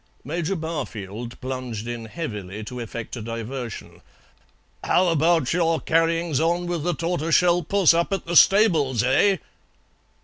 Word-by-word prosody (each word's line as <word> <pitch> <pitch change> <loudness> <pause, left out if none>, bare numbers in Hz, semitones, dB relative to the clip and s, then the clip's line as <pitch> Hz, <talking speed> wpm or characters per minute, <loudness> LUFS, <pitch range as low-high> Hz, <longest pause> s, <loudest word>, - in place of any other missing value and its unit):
Major 170 +5 -2
Barfield 120 - -6
plunged 125 -4 -5
in 120 -1 -5
heavily 105 - -6
to 125 +3 -7
effect 115 0 -6
a 120 - -6
diversion. 115 +1 -6 0.8
"How 180 0 +3
about 165 -3 +2
your 165 -2 +1
carryings 165 -2 +1
on 170 +2 +1
with 175 -2 -2
the 175 +1 0
tortoiseshell 170 +1 +2
puss 195 -1 +4
up 170 +3 0
at 195 -3 -2
the 170 +1 -3
stables, 160 - +5
eh?" 185 +10 +3
160 Hz, 135 wpm, -23 LUFS, 120-170 Hz, 0.8 s, stables